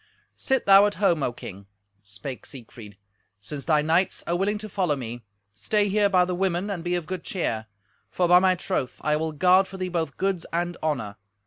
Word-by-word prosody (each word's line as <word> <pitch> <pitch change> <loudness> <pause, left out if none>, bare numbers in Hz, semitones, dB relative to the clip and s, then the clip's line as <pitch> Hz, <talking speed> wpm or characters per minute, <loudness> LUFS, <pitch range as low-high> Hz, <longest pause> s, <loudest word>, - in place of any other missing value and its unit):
"Sit 265 -2 -1
thou 195 +1 +7
at 205 - -4
home, 180 -6 +2
O 125 - 0
King," 100 -4 -10 0.3
spake 105 +6 -8
Siegfried. 115 -5 -12 0.4
"Since 140 +8 -8
thy 155 -2 +3
knights 165 +4 +1
are 170 - -1
willing 200 +4 0
to 215 +1 -7
follow 185 -7 0
me, 120 -2 -6 0.3
stay 205 - 0
here 205 0 +3
by 180 -2 +4
the 180 - -3
women 185 +2 -1
and 175 -4 -4
be 175 0 -1
of 175 -2 -3
good 185 0 -5
cheer; 110 - -3 0.4
for, 175 +9 0
by 180 +1 +7
my 185 0 +3
troth, 180 -7 -3
I 150 0 +1
will 160 +1 -2
guard 185 +5 +4
for 190 - -9
thee 185 -1 -3
both 165 -5 -3
goods 190 -2 -1
and 175 +1 -1
honour. 110 -10 -2
175 Hz, 205 wpm, -25 LUFS, 140-190 Hz, 0.4 s, thou